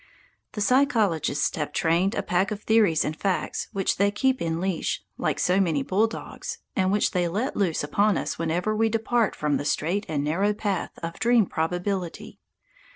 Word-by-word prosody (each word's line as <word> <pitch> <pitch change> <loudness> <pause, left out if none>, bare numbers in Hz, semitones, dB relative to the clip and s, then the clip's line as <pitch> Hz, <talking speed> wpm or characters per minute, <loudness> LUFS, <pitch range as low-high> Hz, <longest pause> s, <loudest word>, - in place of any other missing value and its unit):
The 210 - -4
psychologists 215 - +2
have 150 -2 -2
trained 170 +8 +1
a - - -1
pack 180 +2 +1
of 210 0 -5
theories 210 -8 +3
and 155 - -2
facts 190 +1 -2
which 195 -1 0
they 200 +1 +3
keep 260 +5 0
in 165 0 -1
leash, 185 -2 -2 0.2
like - - 0
so 185 +2 +2
many 160 -7 +1
bulldogs, 215 +8 -2 0.2
and 190 -1 +2
which 205 +1 +2
they 180 -2 +1
let 210 +10 -2
loose 180 -7 0
upon 200 +6 +2
us - - -3
whenever 175 +6 0
we 225 +1 +2
depart 225 0 +1
from 150 -2 0
the - - -4
straight 170 +7 -1
and 145 -3 -1
narrow 190 +8 +1
path 200 -4 -3
of 165 +2 -5
dream 230 0 +4
probability. 180 +2 -3
190 Hz, 175 wpm, -25 LUFS, 165-210 Hz, 0.2 s, dream